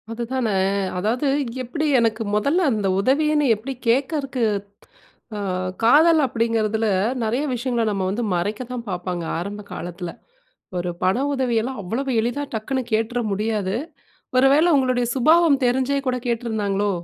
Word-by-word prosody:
அதுதான! 240 +2 -2 0.5
அதாவது 230 +9 0 0.4
எப்டி 300 +6 -2
எனக்கு 225 -1 +1
மொதல்ல 280 - +2
அந்த 210 -4 0
உதவின்னு 295 +6 +2
எப்டி 240 +6 -6
கேட்கறக்கு 270 +1 0 0.9
ஆ - - -4 0.4
காதல் 315 +7 +6
அப்படிங்கிறதில 225 -2 0 0.4
நெறைய 235 +6 0
விஷயங்கள 240 -1 -1
நம்ம 195 -2 -1
வந்து 215 +5 -2
மறைக்க 205 +7 -2
தான் 240 -2 -5
பார்ப்பாங்க 180 -1 -3 0.2
ஆரம்ப 200 +4 -5
காலத்தில. 175 +1 -6 0.7
ஒரு 175 0 -2
பண 185 +3 +3 0.2
உதவியெல்லாம் 250 -2 -1
அவ்வளவு 240 +9 -3
எளிதா 245 +5 -2
டக்குனு 260 +4 -2
கேட்டுற 225 +2 0
முடியாது. 205 -1 -1 0.6
ஒருவேள 275 +5 +5
உங்களுடைய 255 -2 +1
சுபாவம் 310 +2 +4
தெரிஞ்சே 260 +3 +1
கூட 250 0 0
கேட்டிருந்தாங்களோ? 210 -4 -1
235 Hz, 125 wpm, -22 LUFS, 210-265 Hz, 0.9 s, காதல்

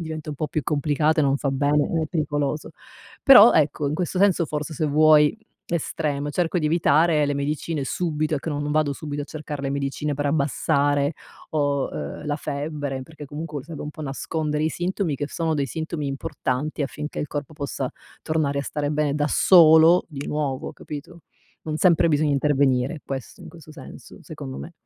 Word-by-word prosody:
diventa 155 -2 -6
un 145 - -6
po' 155 - -2
più 150 +1 -2
complicata 150 +1 +1
e - - +3
non 135 0 +2
fa 140 -1 -1
bene, 145 +4 +1
è - - -2
pericoloso. 150 -2 -2 0.5
Però 245 -4 +9
ecco, 145 -1 +2
in 150 - -2
questo 180 - -4
senso 185 -4 +3
forse 150 +1 -4
se 155 - -1
vuoi, 150 +1 +5 0.3
estremo, 150 -3 -2
cerco 175 +3 0
di 155 - 0
evitare 155 -1 +3
le 145 - 0
medicine 145 +1 -2
subito, 155 -1 -1
ecco 150 +3 -3
n 145 -1 -2
non 145 - -3
vado 150 -1 +1
subito 145 0 -5
a - - -5
cercar 150 -2 -7
le 135 0 -2
medicine 140 +1 -2
per 145 +1 -2
abbassare, 145 0 +1 0.4
o 145 -3 0
ehm, 150 - -6
la 145 0 -1
febbre, 145 -2 -4
perché 150 +1 -11
comunque 150 0 -6
serve 160 -2 -8
un 150 - -5
po' 155 - -9
nascondere 150 +2 -2
i - - +2
sintomi 175 -2 -2
che 145 - -3
sono 160 +1 -2
dei 140 -2 0
sintomi 160 0 -4
importanti 140 0 -3
affinché 150 +2 -5
il 150 - -2
corpo 145 +1 -5
possa 140 -3 -4 0.3
tornare 155 -3 -1
a - - -1
stare 145 0 -3
bene 150 -1 0
da 150 0 +1
solo, 165 +1 +6
di 145 -3 -7
nuovo, 145 -3 -3
capito. 150 +3 -9 0.4
Non 155 0 -4
sempre 170 -2 +4
bisogna 150 -1 +2
intervenire, 140 0 +1
questo 135 -3 -6
in - - -10
questo 160 -3 -13
senso, - - -12
secondo 65 0 -8
me. 70 - -8
150 Hz, 185 wpm, -23 LUFS, 140-155 Hz, 0.5 s, Però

